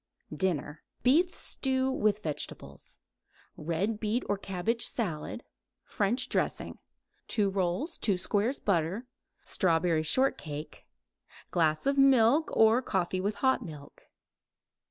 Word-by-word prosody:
DINNER 155 -5 -2 0.2
Beef 320 +9 +3
stew 265 -1 -1
with 215 -5 +1
vegetables; 150 -2 -6 0.6
red 175 +8 -2
beet 220 +3 -1
or 205 - +1
cabbage 200 +4 -2
salad, 185 -1 -3 0.4
French 230 +6 0
dressing; - - -2 0.5
2 205 -3 +1
rolls; 195 - -2
2 200 -4 +1
squares 210 +8 0
butter; 190 +4 0 0.4
strawberry 165 -3 +2
short 260 - +1
cake; 150 0 -8 0.6
glass 155 -3 +1
of 275 0 +2
milk 270 +2 +5
or 225 +3 +5
coffee 185 -5 -1
with 205 +2 -1
hot 260 -1 +2
milk. 150 -6 -11
205 Hz, 115 wpm, -29 LUFS, 170-250 Hz, 0.6 s, milk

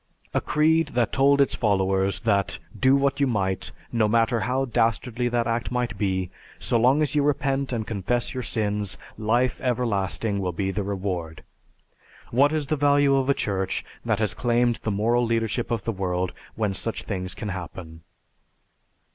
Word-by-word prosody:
A - - +1
creed 160 +1 +2
that 120 -3 +1
told 140 +1 +4
its 140 - +3
followers 95 -2 +1
that 100 -5 +1 0.2
do 130 +1 +4
what 140 0 +1
you 140 - +3
might, 95 -6 -1 0.2
no 115 -3 +2
matter 115 +1 +2
how 130 +4 0
dastardly 115 0 0
that 120 -1 +1
act 115 0 -1
might 125 -2 -1
be, 95 -3 -1 0.3
so 115 - +1
long 130 +6 +4
as 145 - -1
you 150 - +3
repent 140 -2 0
and 115 -3 -2
confess 115 +3 -1
your 130 - -3
sins, 105 -4 -1 0.2
life 120 +3 +1
everlasting 110 -4 -1
will 90 -2 -2
be 95 +3 -1
the 100 +2 -2
reward. 95 -5 -4 0.9
What 140 +5 +4
is 155 -2 -1
the 155 - 0
value 145 -1 +4
of 135 0 +1
a 140 - +4
church 95 -2 -2 0.2
that 110 -3 +1
has 110 -1 0
claimed 120 -1 +1
the - - -4
moral 115 +4 +2
leadership 115 0 -1
of 115 -4 -1
the 115 - -1
world 90 -2 -1 0.2
when 105 -3 0
such 115 +3 -4
things 95 -3 -4
can 105 - -5
happen? 85 -3 -7
115 Hz, 170 wpm, -25 LUFS, 100-130 Hz, 0.9 s, told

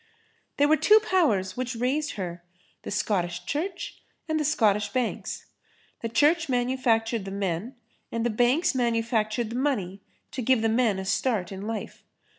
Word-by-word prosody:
"There 290 - +4
were 310 +1 +4
two 425 +6 +6
powers, 245 - +1
which 255 0 -3
raised 275 +5 0
her—the 180 -1 -9
Scottish 180 -4 -1
Church 350 +6 -4 0.3
and 315 -1 0
the - - +1
Scottish 210 -8 +2
banks. 245 +1 -3 0.6
The 230 - -2
Church 300 +7 +3
manufactured 240 -3 +1
the 195 - -6
men 195 +4 -3 0.4
and 230 0 -1
the 240 - +1
banks 245 +10 +2
manufactured 230 -2 0
the - - -4
money 200 -9 -1 0.3
to 260 - -4
give 250 -1 +3
the 225 - +3
men 225 -3 +2
a 190 - -4
start 205 -3 0
in 195 +2 -6
life.... 225 -1 -5
230 Hz, 155 wpm, -26 LUFS, 200-265 Hz, 0.6 s, two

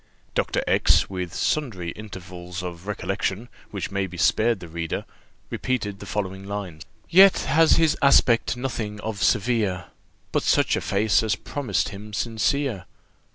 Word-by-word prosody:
Doctor - - 0
X, - - +3
with 90 -2 -4
sundry 100 - -1
intervals 90 -3 -8
of 90 +1 -7
recollection, 100 +2 -3 0.2
which - - -5
may 100 -1 -1
be 90 -1 -10
spared 115 +5 +2
the 85 - -9
reader, 85 0 -4 0.5
repeated 105 -6 -2
the - - -9
following 95 -2 -3
lines: 100 -5 -6 0.3
"Yet 190 +2 +7
has 155 +4 +4
his 160 -2 +3
aspect 125 -3 +4
nothing 115 -5 -4
of 110 -3 -4
severe, 105 -6 +1 0.4
But - - +1
such - - +2
a - - -2
face 100 +2 +2
as 110 -3 0
promised 140 +6 -2
him 105 +1 -10
sincere. 115 0 -1
105 Hz, 145 wpm, -24 LUFS, 95-120 Hz, 0.5 s, Yet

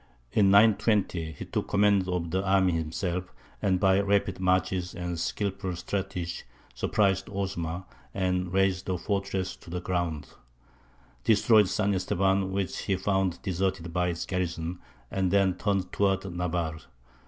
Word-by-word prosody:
In 100 -2 +4
920 100 -5 +3
he - - -8
took - - -3
command 100 -2 +3
of 85 -2 -2
the 95 +2 0
army 95 -1 +3
himself, 85 +3 -2 0.3
and 95 -2 +2
by 95 0 +4
rapid 100 -2 +1
marches 90 0 0
and 90 -1 -4
skilful 95 -1 -2
strategy 90 -2 -3 0.3
surprised 95 - +1
Osma, 95 -3 -3 0.3
and 90 -2 -1
razed 95 0 +1
the 95 -1 0
fortress 100 0 -2
to - - -15
the 90 +1 -3
ground; 85 -5 -2 0.9
destroyed 110 -1 +5
San 100 -1 +1
Estevan, 95 +1 +1
which 95 -1 -2
he 95 - +1
found 95 -2 0
deserted 95 -2 -2
by 90 0 +1
its 85 -1 -2
garrison; 90 -1 -3 0.3
and 95 -1 0
then 95 0 +3
turned 95 0 -1
towards 95 -1 +1
Navarre. 85 -3 -2
95 Hz, 140 wpm, -28 LUFS, 90-100 Hz, 0.9 s, destroyed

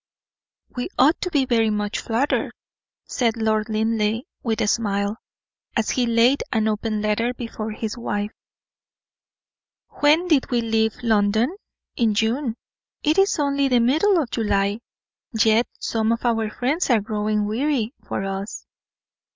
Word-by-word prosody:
"We 245 - -3
ought 305 +5 +4
to 360 - -1
be 285 -6 +2
very 230 -3 +2
much 210 -1 -2
flattered," 240 +6 -1 0.5
said 235 -2 0
Lord 220 -1 0
Linleigh, 220 +1 0 0.2
with 225 -3 -1
a - - +2
smile, 205 -1 0 0.6
as 225 - +1
he 245 -2 +1
laid 235 +4 +3
an 220 -1 +1
open 215 0 -1
letter 230 +4 0
before 225 -3 -5
his 220 +2 -5
wife. 205 -2 -2 1.7
"When 310 +5 +4
did 305 -6 +2
we 240 -2 +1
leave 220 -1 +1
London? 220 - +2 0.4
in 225 -3 +1
June. 230 +2 0 0.5
It 310 +5 +3
is 390 +1 +3
only 280 -2 +1
the 250 -2 +3
middle 315 - +3
of 260 -7 -2
July, 205 -2 0 0.6
yet 225 +2 +4
some 220 0 0
of 230 +1 -2
our 225 -2 +1
friends 270 +10 -1
are 235 -3 +5
growing 210 0 -1
weary 240 +2 -1
for - - -3
us." 195 +1 -5
225 Hz, 145 wpm, -22 LUFS, 215-250 Hz, 1.7 s, are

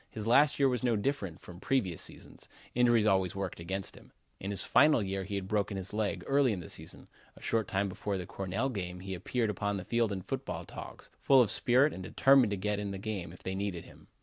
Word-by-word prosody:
His 110 -2 -6
last 140 +6 +5
year 140 - +4
was 125 -3 0
no 120 -2 +2
different 100 - -2
from 90 -1 -11
previous 100 -8 0
seasons; - - -9 0.2
injuries 120 -3 +4
always 95 -3 +2
worked 95 -3 -4
against 95 +3 -4
him. - - -16 0.3
In 95 - -5
his 100 - +1
final 135 -1 +5
year 95 0 -3
he 100 +1 -4
had 95 -1 -3
broken 100 -1 0
his 95 +1 -5
leg 100 -4 -1
early 135 -4 +3
in 95 - -4
the 85 - -8
season. - - -7 0.3
A - - -16
short 110 -3 0
time 100 +1 0
before 100 +1 -3
the 90 - -5
Cornell 95 +9 -2
game 90 -6 -5
he 95 0 -5
appeared 110 +5 -1
upon 100 0 -2
the 95 - -6
field 115 -2 +1
in 95 -2 -4
football - - -4
togs, - - -10
full 135 -1 +6
of 110 - 0
spirit 130 +5 +3
and 95 - -7
determined 135 +5 +4
to 100 - -2
get 105 +2 -1
in 105 -1 -3
the 100 - -4
game 95 -4 -4
if 90 - -14
they 95 - -3
needed 95 -3 -3
him. - - -17
100 Hz, 235 wpm, -31 LUFS, 95-120 Hz, 0.3 s, full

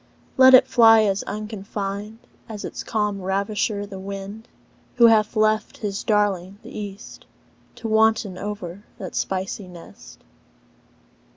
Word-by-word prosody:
Let 260 -1 +8
it 255 - +7
fly 225 -2 +6
as 200 -1 0
unconfined 210 0 -5 0.3
As 210 -2 -6
its - - -6
calm 210 -3 -2
ravisher 200 +2 -1
the 195 -2 -9
wind, 200 +3 -8 0.5
Who 235 - +6
hath 220 -1 +4
left 215 +4 +1
his 205 -5 -4
darling, 200 -3 0
th' - - -11
east, 205 -1 -9 0.5
To 230 - -6
wanton 220 -3 +2
in 190 -3 -6 0.2
that 185 -3 -7
spicy 190 +1 -3
nest. 175 -2 -14
205 Hz, 125 wpm, -23 LUFS, 195-220 Hz, 0.5 s, Let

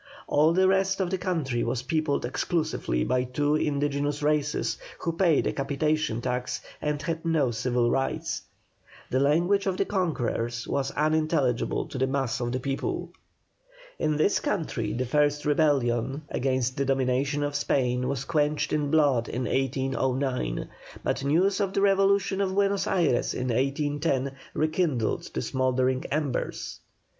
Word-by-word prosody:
All 155 +2 +4
the 185 +2 +4
rest 195 0 +2
of 185 -2 0
the 190 - -1
country 160 -10 -1
was 120 +1 -2
peopled 155 -1 0
exclusively 150 - -1
by 125 - +1
two 145 +4 0
indigenous 145 0 0
races, 150 0 0 0.2
who 170 - -2
paid 165 -3 +3
a - - 0
capitation 140 -2 0
tax, 125 0 -2 0.2
and 150 -1 -1
had 165 -1 -3
no 160 -7 +2
civil 120 +1 +1
rights. 135 +2 -1 0.7
The 130 - +2
language 175 +8 +2
of 185 -1 0
the - - +1
conquerors 120 - -1
was 135 -1 -1
unintelligible 155 -5 +1
to 145 -4 -6
the 130 - +2
mass 135 -3 -1
of 120 -1 -2
the 130 - -1
people. 135 +1 -3 0.9
In 155 -1 +1
this 155 +7 +3
country 120 - -2
the 125 +3 -1
first 145 +3 +1
rebellion 140 -3 +1
against 130 -1 0
the 140 - +1
domination 135 +2 +1
of 145 0 -2
Spain 125 -3 0
was 135 -1 -2
quenched 150 0 0
in 150 -2 0
blood 140 -6 +3
in 125 - -2
1809, 130 - -1 0.4
but 135 - -1
news 180 +8 +2
of 195 -2 0
the 195 - +1
revolution 195 0 +3
of 190 -1 0
Buenos 200 0 +1
Ayres 165 -10 +1
in 125 0 -2
1810 140 +2 0 0.2
rekindled 155 -7 0
the 65 - -1
smouldering 130 0 +1
embers. 145 -4 -2
145 Hz, 150 wpm, -27 LUFS, 130-160 Hz, 0.9 s, All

